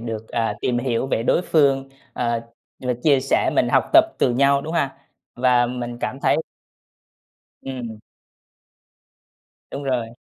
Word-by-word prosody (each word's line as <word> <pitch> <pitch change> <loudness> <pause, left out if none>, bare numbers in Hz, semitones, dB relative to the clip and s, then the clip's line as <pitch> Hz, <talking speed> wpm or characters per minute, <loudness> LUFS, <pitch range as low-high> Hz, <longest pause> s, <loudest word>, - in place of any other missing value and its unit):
được, 115 -1 -6
à, 115 -3 -1
tìm 120 -1 0
hiểu 120 0 -1
về 115 - -1
đối 170 - +2
phương, 135 -5 +2 0.2
ờ, 120 -1 -1 0.4
và 125 -1 -1
chia 140 -4 +4
sẻ 135 - +1
mình - - +2
học - - +3
tập - - +8
từ - - +3
nhau, 140 +2 +3
đúng 160 - -5
ha? 140 -5 0 0.4
Và 125 -1 +3
mình 120 -1 -5
cảm 135 - -4
thấy - - +3 1.3
Ừm. 120 -5 -6 1.7
Đúng 140 - -5
rồi. 125 -4 -1
125 Hz, 145 wpm, -22 LUFS, 120-135 Hz, 1.7 s, tập